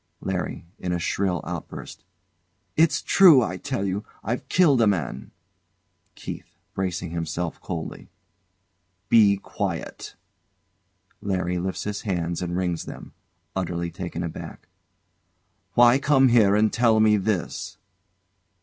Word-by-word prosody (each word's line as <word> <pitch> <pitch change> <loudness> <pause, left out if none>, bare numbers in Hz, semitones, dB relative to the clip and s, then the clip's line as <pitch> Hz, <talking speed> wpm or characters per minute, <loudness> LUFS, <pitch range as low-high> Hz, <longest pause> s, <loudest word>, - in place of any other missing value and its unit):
LARRY. - - -3
[In 90 - -3
a - - 0
shrill 90 0 -1
outburst] 90 +1 -7 0.7
It's 160 0 +3
true, 165 -10 +7
I 95 -4 -3
tell 130 -3 -3
you; 100 +2 -2 0.2
I've 120 +4 -3
killed 150 -9 +4
a 110 - +5
man. 80 -9 -2 0.9
KEITH. - - -9 0.2
[Bracing 90 -3 -3
himself; 85 0 -3
coldly] 85 -3 -6 1.0
Be 105 -3 +6
quiet! - - -5 1.1
LARRY 90 -2 -1
lifts 95 +1 -3
his 105 0 -4
hands 85 -5 -2
and 90 0 -2
wrings 90 -3 -2
them. - - -10 0.4
[Utterly 85 -2 -2
taken 85 0 -5
aback] 85 - -8 1.1
Why 120 +2 +6
come 135 -2 +4
here 110 -4 +5
and 110 +1 +2
tell 115 -2 +3
me 110 -1 +5
this? 100 -3 -2
95 Hz, 120 wpm, -24 LUFS, 85-110 Hz, 1.1 s, true